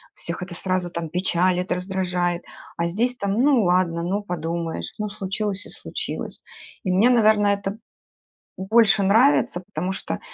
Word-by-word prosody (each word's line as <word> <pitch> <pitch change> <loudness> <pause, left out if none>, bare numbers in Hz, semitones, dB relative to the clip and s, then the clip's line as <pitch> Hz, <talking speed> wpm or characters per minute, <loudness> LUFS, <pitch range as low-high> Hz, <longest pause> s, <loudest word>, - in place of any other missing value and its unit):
Всех 170 +3 -1
это 180 - -8
сразу 185 -1 -1
там 170 -1 -4
печалит, 180 +1 +1
раздражает, 180 -1 -1 0.3
а 170 0 0
здесь 235 +8 0
там: 200 -4 -2
ну 255 +1 +4
ладно, 175 -2 +2
ну 195 +4 -1
подумаешь, 165 - -4
ну 210 -1 -3
случилось 200 +1 -4
и - - -12
случилось. - - -6 0.4
И 185 - 0
мне, 200 +7 +4
наверное, 215 -3 +4
это 200 +1 -5 0.8
больше 215 +1 +4
нравится, 220 -2 +4
потому 190 0 -4
что - - -4
190 Hz, 145 wpm, -23 LUFS, 175-210 Hz, 0.8 s, ну